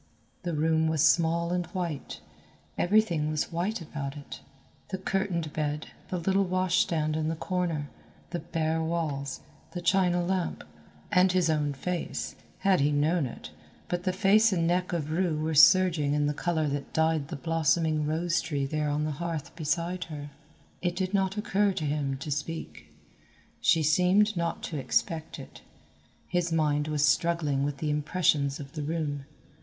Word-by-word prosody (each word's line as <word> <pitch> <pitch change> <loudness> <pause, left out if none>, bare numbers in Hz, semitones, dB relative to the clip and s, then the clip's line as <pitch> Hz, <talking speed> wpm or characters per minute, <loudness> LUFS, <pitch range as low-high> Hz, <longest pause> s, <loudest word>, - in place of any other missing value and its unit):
The 175 -2 -3
room 160 +1 +2
was 160 -2 +2
small 170 +1 +3
and 175 -2 -1
white; 175 -5 -4 0.5
everything 175 -6 +2
was 155 +2 -1
white 185 +5 -2
about 145 -2 -5
it, 145 - -9 0.5
the 190 - -2
curtained 185 -5 -2
bed, 150 0 -2 0.2
the 185 - -2
little 190 +3 +2
wash 185 0 +1
stand 155 -2 +1
in 155 0 -1
the 165 - -1
corner, 170 -4 -2 0.4
the 175 - -2
bare 160 -1 -1
walls, 155 -4 -2 0.3
the 180 - -3
china 175 -1 +2
lamp, 185 -1 -1 0.5
and 180 0 +5
his 180 -3 +2
own 150 -2 0
face, 175 +5 -3 0.3
had 195 -2 +4
he 145 +2 +3
known 150 +1 +2
it, 120 - -9 0.4
but 175 0 -2
the 185 - +1
face 205 +4 +4
and 170 -3 +1
neck 180 +2 +1
of 155 -3 -2
Rue 170 -1 +1
were 155 +1 -1
surging 155 -2 +5
in 150 0 +2
the 145 - +1
colour 160 0 0
that 140 -1 -4
dyed 160 -2 +1
the 165 - -5
blossoming 160 0 +1
rose 165 +2 0
tree 145 -4 -2
there 150 +1 -1
on 145 +1 0
the 155 - -1
hearth 160 0 -4
beside 170 +3 -1
her. 145 -3 -8 0.5
It 175 -1 -1
did 185 +1 -2
not 195 0 +1
occur 205 -1 +1
to 155 - -3
him 145 -2 -1
to 140 +3 -6
speak. 140 - -5 0.7
She 160 - +3
seemed 185 +7 +3
not 170 -1 -2
to 155 - -3
expect 160 +3 -1
it. - - -11 0.7
His 175 -1 0
mind 150 -2 +1
was 150 -1 +2
struggling 150 -3 +1
with 145 0 -2
the 150 +1 -1
impressions 150 -2 +1
of 140 -2 -8
the 155 - -4
room. 145 -2 -3
160 Hz, 170 wpm, -28 LUFS, 150-180 Hz, 0.7 s, and